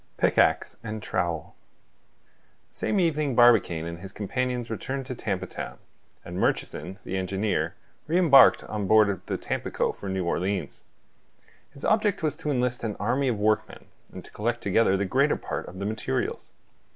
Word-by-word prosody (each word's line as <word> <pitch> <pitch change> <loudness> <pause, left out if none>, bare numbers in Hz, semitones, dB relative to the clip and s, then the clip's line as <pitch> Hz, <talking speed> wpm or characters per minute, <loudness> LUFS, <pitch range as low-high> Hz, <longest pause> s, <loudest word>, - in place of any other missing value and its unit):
PICKAXE - - +2
AND 110 -1 -4
TROWEL 85 -4 -2 1.2
The - - -17
same 205 - 0
evening 155 -6 +1
Barbicane 115 -9 +5
and 85 0 -6
his 95 +2 -8
companions 125 +3 -3
returned 130 +4 -4
to 130 - -5
Tampa 95 -6 -3
Town; - - -7 0.5
and - - -6
Murchison, 90 +6 -1
the 95 - -3
engineer, 95 +3 -1 0.3
re 165 +3 +2
embarked 145 -7 +7
on 105 -2 -4
board 105 -3 +4
the - - -1
Tampico - - -2
for 100 - -8
New 95 -1 -1
Orleans. 90 -1 -2 0.8
His 140 - -9
object 210 -4 +2
was 155 -2 0
to 160 -2 -4
enlist 125 -3 0
an 110 -3 -2
army 125 +6 +1
of 120 -4 0
workmen, 105 +1 0 0.3
and - - -10
to - - -14
collect 120 +3 -2
together 100 0 +3
the 100 - 0
greater 135 +9 +2
part - - -5
of 90 - -10
the 100 - -4
materials. 105 -10 -3
110 Hz, 165 wpm, -26 LUFS, 95-130 Hz, 1.2 s, embarked